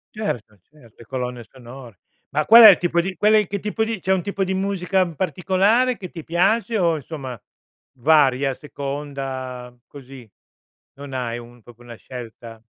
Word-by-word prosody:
Certo, 115 - -5
cert 135 -8 -20
le 115 - -15
colonne 125 -1 -5
sonore. 125 -4 -13 0.3
Ma 150 +1 -1
qual 230 +2 +9
è 220 - +12
il 190 - +6
tipo 175 -1 0
di 185 +2 -5
qual 210 +1 +3
è 210 -3 +4
che 200 - -4
tipo 210 +3 -2
di 220 -2 -3
c'è 190 +2 0
un 185 - 0
tipo 195 +2 -3
di 190 - -2
musica 190 -1 0
particolare 195 - +1
che 185 -4 -9
ti 165 -3 -9
piace 220 +7 +1
o 170 -4 +1
insomma 135 -5 -8 0.6
varia, 140 -1 +3
a - - -4
seconda 135 -3 -6
così? 135 -4 -13 0.7
Non 140 -1 -9
hai 120 -2 -3
un 120 0 -14
proprio 120 +1 -17
una 120 - -9
scelta. 115 -2 -11
145 Hz, 175 wpm, -21 LUFS, 125-190 Hz, 0.7 s, è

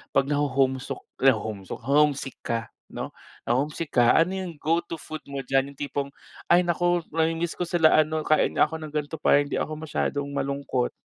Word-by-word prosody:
pag 135 - +5
naho-homesick, 135 -2 0 0.2
naho-homesok? 110 -6 0
Na 135 - -3
homesick 145 -3 +2
ka 115 -1 0 0.3
'no, - - -6 0.3
na - - -1
homesick 150 +3 -2
ka, 120 -1 +5
ano 165 +3 +4
yung 180 -3 -4
go 165 +3 +3
to 165 - -5
food 155 0 -7
mo 140 -1 -5
diyan 135 +2 0
yung - - -26
tipong, 140 -1 -3 0.4
"Ay 175 +1 +5
naku, 175 0 +1
namiimiss 165 +1 0
ko 175 - -1
sila 165 -2 +4
ano, 155 0 +1
kain 155 - +2
nga - - +5
ako 160 +1 -1
ng 155 -1 -8
gan'to 150 +1 -3
para 145 -1 +4
hindi 145 - -3
ako 155 - -3
masyadong 145 -2 -2
malungkot." 140 -2 -1
145 Hz, 190 wpm, -26 LUFS, 135-160 Hz, 0.4 s, pag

